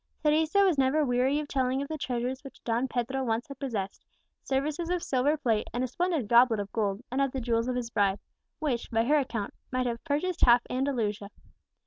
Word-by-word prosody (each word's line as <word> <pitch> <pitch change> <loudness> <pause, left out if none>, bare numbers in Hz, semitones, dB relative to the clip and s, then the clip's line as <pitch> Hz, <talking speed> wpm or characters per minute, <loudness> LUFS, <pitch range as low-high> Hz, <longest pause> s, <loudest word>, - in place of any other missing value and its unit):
Teresa 315 +6 +3
was 360 -7 +3
never 275 +3 +3
weary 255 +3 +2
of 300 - -4
telling 260 -1 0
of 280 - -3
the 315 - -4
treasures 255 -2 -3
which 275 - -12
Don 235 +2 0
Pedro 260 +2 -2
once 230 -1 -1
had 275 -2 -10
possessed, 215 -8 -4 0.4
services 295 +5 -1
of 355 -1 -1
silver 275 +4 +1
plate, 230 -7 0
and 245 - 0
a - - 0
splendid 325 - -1
goblet 235 -1 +5
of 200 -1 -4
gold, 205 -2 -1
and 265 +2 0
of 275 -1 +1
the 265 - -2
jewels 230 -1 0
of 255 - -1
his 240 -2 -3
bride, 200 -3 +2 0.4
which, 275 -7 -2
by 225 0 +2
her 300 +4 +4
account, 230 -7 -3 0.2
might 255 0 0
have 235 -1 -3
purchased 330 +4 -1
half 240 0 +6
Andalusia. 230 -6 -1
255 Hz, 205 wpm, -28 LUFS, 235-285 Hz, 0.4 s, half